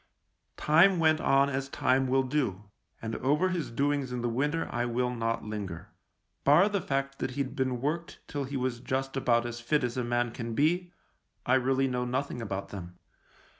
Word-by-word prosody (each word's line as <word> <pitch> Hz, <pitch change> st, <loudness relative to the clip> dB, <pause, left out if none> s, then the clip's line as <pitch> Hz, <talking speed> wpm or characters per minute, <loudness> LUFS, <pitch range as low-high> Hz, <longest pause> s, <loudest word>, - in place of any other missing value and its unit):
Time 175 Hz, +5 st, +5 dB
went 160 Hz, -1 st, +3 dB
on 135 Hz, 0 st, +4 dB
as 135 Hz, 0 st, -2 dB
time 130 Hz, -1 st, +2 dB
will 135 Hz, +1 st, +3 dB
do, 125 Hz, -8 st, -1 dB, 0.4 s
and 110 Hz, 0 st, -3 dB
over 150 Hz, +8 st, +2 dB
his 175 Hz, -4 st, -2 dB
doings 140 Hz, +1 st, 0 dB
in 125 Hz, -1 st, -3 dB
the 120 Hz, -, +1 dB
winter 145 Hz, +7 st, 0 dB
I 120 Hz, 0 st, -1 dB
will 125 Hz, +1 st, 0 dB
not 115 Hz, -2 st, -2 dB
linger. 100 Hz, -6 st, -5 dB, 0.5 s
Bar 170 Hz, +9 st, +6 dB
the 200 Hz, -2 st, -1 dB
fact 135 Hz, -1 st, -2 dB
that 125 Hz, -, -3 dB
he'd 135 Hz, -2 st, -2 dB
been 130 Hz, -2 st, -1 dB
worked 170 Hz, +5 st, -3 dB
till 145 Hz, -1 st, -3 dB
he 135 Hz, +1 st, -4 dB
was 125 Hz, -2 st, -2 dB
just 135 Hz, +2 st, -2 dB
about 120 Hz, -3 st, +2 dB
as 120 Hz, 0 st, -5 dB
fit 145 Hz, +4 st, +1 dB
as 120 Hz, 0 st, -2 dB
a 125 Hz, -, 0 dB
man 120 Hz, 0 st, 0 dB
can 115 Hz, -1 st, -5 dB
be, 175 Hz, +6 st, +1 dB, 0.5 s
I 125 Hz, -, +2 dB
really 130 Hz, +1 st, +3 dB
know 125 Hz, -1 st, -1 dB
nothing 125 Hz, 0 st, -2 dB
about 100 Hz, -3 st, -4 dB
them. 90 Hz, -3 st, -8 dB
130 Hz, 190 wpm, -29 LUFS, 120-145 Hz, 0.5 s, Bar